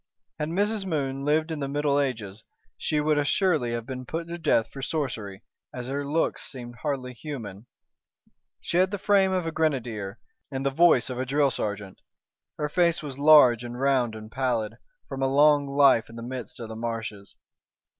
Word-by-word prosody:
Had 150 0 -2
Mrs. 205 +4 0
Moon 140 -4 -2
lived 155 +2 +1
in 160 - -3
the 140 - -2
Middle 145 0 +1
Ages, 110 -7 -3 0.3
she 150 - -1
would 150 0 +2
assuredly 145 -4 +1
have 115 -1 -3
been 130 0 -6
put 165 +6 -5
to 170 0 -5
death 115 -8 +2
for 135 - -8
sorcery, 115 -9 -3 0.3
as 125 -1 -5
her 140 +1 -2
looks 150 +4 0
seemed 120 -3 -8
hardly 130 -3 -3
human. 120 -6 -8 0.9
She 170 - -2
had 185 +1 +4
the 205 - -3
frame 195 -1 +3
of 185 -2 0
a 165 - -2
grenadier 120 -10 -1 0.3
and 135 -1 -4
the 135 - +2
voice 140 -5 +4
of 125 - -4
a 130 - -1
drill 140 0 +2
sergeant. 100 -4 -4 0.6
Her 150 - -1
face 170 +1 +2
was 140 -2 -7
large 140 -6 +7
and 120 0 -7
round 130 -4 +2
and 110 0 -10
pallid, 120 -4 -1 0.3
from 135 - -5
a 135 - +3
long 145 +1 +4
life 140 -5 +4
in 115 - -12
the 115 - -7
midst 125 -3 -7
of 115 -2 -7
the 110 - -6
marshes. 115 -4 -5
135 Hz, 185 wpm, -26 LUFS, 120-150 Hz, 0.9 s, large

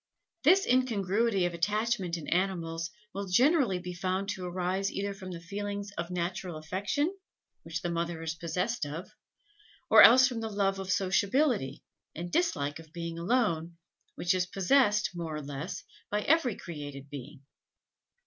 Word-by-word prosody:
This 370 +7 +6
incongruity 225 -5 +2
of 175 - -1
attachment 205 0 0
in 160 - -8
animals 170 -3 -1 0.2
will 200 0 -4
generally 250 - +4
be 180 0 -6
found 185 +2 -2
to 190 -3 -3
arise 185 +2 -1
either 200 0 -2
from 190 -1 -9
the 175 -2 -6
feelings 200 +3 -5
of 170 +1 -4
natural 180 -1 -3
affection 200 - -1 0.5
which 165 +2 -5
the 175 - -1
mother 170 0 -2
is 160 0 -2
possessed 180 +6 -2
of, 155 +5 -5 0.8
or - - +10
else 255 +3 +9
from 245 -4 -3
that 220 -1 -4
love 195 -1 +1
of 190 -1 -3
sociability, 200 - +1 0.3
and 175 +2 -5
dislike 160 - 0
of 160 -1 -14
being 170 0 -5
alone, 170 -5 0 0.4
which 175 - +1
is 180 -1 0
possessed, 210 +2 +3
more 165 -3 -4
or 150 - -5
less, 145 +4 -5 0.3
by 210 0 0
every 285 -8 +3
created 145 -4 -8
being. 140 0 -9
185 Hz, 155 wpm, -30 LUFS, 170-210 Hz, 0.8 s, or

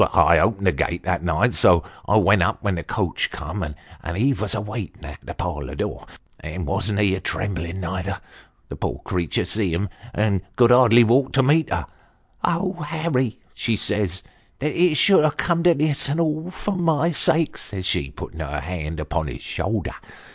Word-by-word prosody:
I - - +6
opened 100 -3 +1
the 90 - +5
gate 85 0 -2
that 90 -2 0
night, 90 +8 +1
so 85 -3 +5 0.2
I - - +3
went - - +5
up - - 0
when 100 - +1
the 85 - -3
coach - - -1
come, - - -6
and 80 +3 -7
he 130 +7 +3
vos 105 -5 -2
a - - -1
waitin' 105 -1 -6
at - - -9
the - - -8
parlour 85 -4 -4
door - - -4 0.3
and 80 +3 -5
wasn't 100 +8 -1
he 100 -2 +3
a 95 - -1
trembling, 95 -2 -3
neither? 95 +2 -3 0.5
The - - -7
poor - - -4
creetur 85 -3 -1
see 105 -5 0
him, 95 +5 -1 0.2
and 105 -4 +1
could 120 -1 +5
hardly 120 -1 +7
walk 130 +4 +3
to 135 - +4
meet 150 +3 +3
him. 85 -4 -1 0.3
' - - -41 0.2
Oh, 175 +1 0
Harry! 150 -6 -1
' - - -36
she 115 - -1
says, 100 -4 -1 0.2
' - - -37
that 150 +2 -2
it 175 -2 +3
should 195 -6 +5
have 155 -1 +1
come 170 -1 +1
to 175 -1 +6
this; 145 -1 +1
and 150 +4 0
all 160 +1 0
for 195 +2 -3
niy 165 -2 +2
sake,' 165 0 +1
says 95 -2 -6
she, 70 -6 0
putting 75 +2 -9
her 75 -1 -3
hand 80 0 -5
upon 80 +1 -2
his - - -7
shoulder. - - -2
105 Hz, 200 wpm, -22 LUFS, 90-150 Hz, 0.5 s, hardly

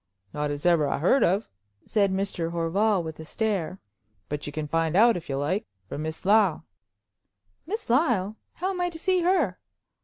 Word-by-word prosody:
"Not 150 0 -1
as 145 +1 -5
I 175 - +6
ever 155 -4 +2
heard 185 - +3
of," 195 +5 +2 0.4
said 200 -3 +2
Mr. 190 -3 -1
Horval, 175 +4 +1
with 160 -1 -7
a - - -6
stare, 190 -1 -2 0.5
"but 150 0 -4
you - - -4
can 150 0 -4
find 165 +1 0
out, 230 +2 +6
if 170 - -7
you 135 - -1
like, 160 +9 -1 0.2
from 145 - -5
Miss 160 +2 -5
Lyle." 200 -5 +3 1.0
"Miss 435 +5 -4
Lyle! 230 - +2 0.2
How 375 +3 -2
am 360 -2 -3
I 355 - +1
to 335 - -9
see 370 +2 +1
her?" 335 - +1
190 Hz, 185 wpm, -26 LUFS, 160-230 Hz, 1.0 s, I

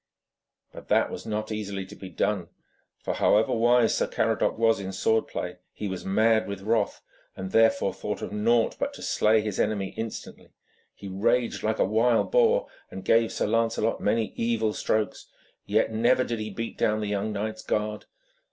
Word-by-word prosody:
But - - -11
that - - +2
was - - -7
not 110 0 -3
easily 100 -3 -4
to - - -12
be 95 - -9
done, 90 0 -1 0.6
for - - -1
however 110 +5 +3
wise 120 0 +3
Sir - - +1
Caradoc - - 0
was 115 -2 +3
in 95 -1 -5
sword 110 +4 +1
play, 90 0 -5 0.2
he 105 - -5
was 95 -2 -5
mad 110 +3 +2
with 100 -1 -6
wrath, 110 -1 0 0.3
and 95 0 -5
therefore 115 0 +3
thought - - -5
of - - -5
naught 115 +2 +2
but - - -2
to - - -10
slay 110 +1 +3
his 105 -2 -4
enemy 100 -3 0
instantly. 110 -1 -7 0.4
He 100 - -10
raged 110 +5 0
like 110 0 0
a - - +3
wild 115 +4 +2
boar, - - +4 0.2
and 95 - -9
gave 115 0 +3
Sir - - -1
Lancelot 115 0 0
many 110 0 0
evil 115 -2 0
strokes, 105 -3 -1 0.4
yet 110 +2 +2
never 120 +3 +3
did 115 -2 -3
he 110 0 -4
beat 115 +3 -6
down 110 0 +2
the 105 - -2
young 105 +1 -1
knight's 110 +1 -4
guard. 105 0 -2
110 Hz, 180 wpm, -26 LUFS, 100-115 Hz, 0.6 s, boar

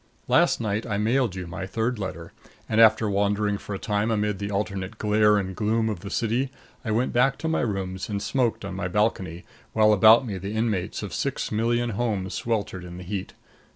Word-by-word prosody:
Last - - +4
night 110 -1 -1
I 105 - -1
mailed 115 0 +1
you 90 -1 -5
my 95 +2 -6
third 115 +3 -1
letter, 85 -4 -5 0.4
and 110 +1 +3
after 110 0 +6
wandering 100 0 +1
for 105 - -6
a - - -3
time 105 +2 -1
amid 105 -3 0
the 100 0 -3
alternate 100 0 -3
glare 105 0 +3
and 95 -2 -3
gloom 110 +2 +1
of 105 -5 -3
the 100 +2 -8
city, 120 +5 0 0.3
I 115 - -4
went 115 +4 0
back 135 +3 +3
to 160 - -4
my 160 - +1
rooms 95 -4 -3
and 100 -1 -2
smoked 120 0 0
on 95 - -5
my 95 -1 -3
balcony 95 -3 -1 0.3
while 110 -1 +5
about 110 +4 +7
me 100 -5 -4
the 100 +4 -5
inmates 110 -5 -1
of - - -6
six - - -2
million 120 +2 +1
homes 100 -4 -2
sweltered 105 -5 -2
in 90 0 -9
the 90 - -8
heat. 95 +1 -5
105 Hz, 205 wpm, -25 LUFS, 95-115 Hz, 0.4 s, about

